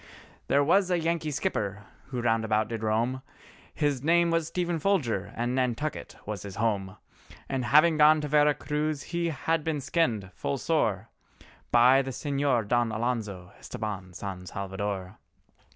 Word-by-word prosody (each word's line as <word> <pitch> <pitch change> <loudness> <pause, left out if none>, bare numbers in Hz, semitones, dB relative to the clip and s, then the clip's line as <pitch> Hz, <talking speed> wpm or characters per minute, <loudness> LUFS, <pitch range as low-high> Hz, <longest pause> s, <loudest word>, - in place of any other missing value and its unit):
There 140 +1 +3
was 185 +5 +3
a 180 - +2
Yankee 165 -1 -1
skipper 105 - -2 0.2
who 125 -3 -4
round 115 -1 +2
about 110 0 +1
did 115 -2 -4
roam, 115 +4 0 0.5
His 145 -4 0
name 170 +3 +3
was 165 -2 +1
Stephen 175 -1 -1
Folger 120 - 0
and 120 +2 -1
Nantucket 130 +3 -2
was 105 -2 -4
his 100 -1 -8
home, 100 -3 -1 0.5
And 130 -2 -2
having 155 +5 +5
gone 155 +1 +7
to 150 - -3
Vera 150 0 +4
Cruz 150 0 -2
he 170 0 -2
had 160 +2 -1
been 155 -2 -1
skinned 120 - 0
full 70 - -3
sore - - 0 0.6
By 125 +3 +6
the 135 - -5
Señor 135 -4 0
Don 120 0 +2
Alonzo 110 -6 -3
Estabán 100 -6 -6
San 90 -2 -6
Salvador. 95 0 -4
125 Hz, 150 wpm, -28 LUFS, 105-155 Hz, 0.6 s, gone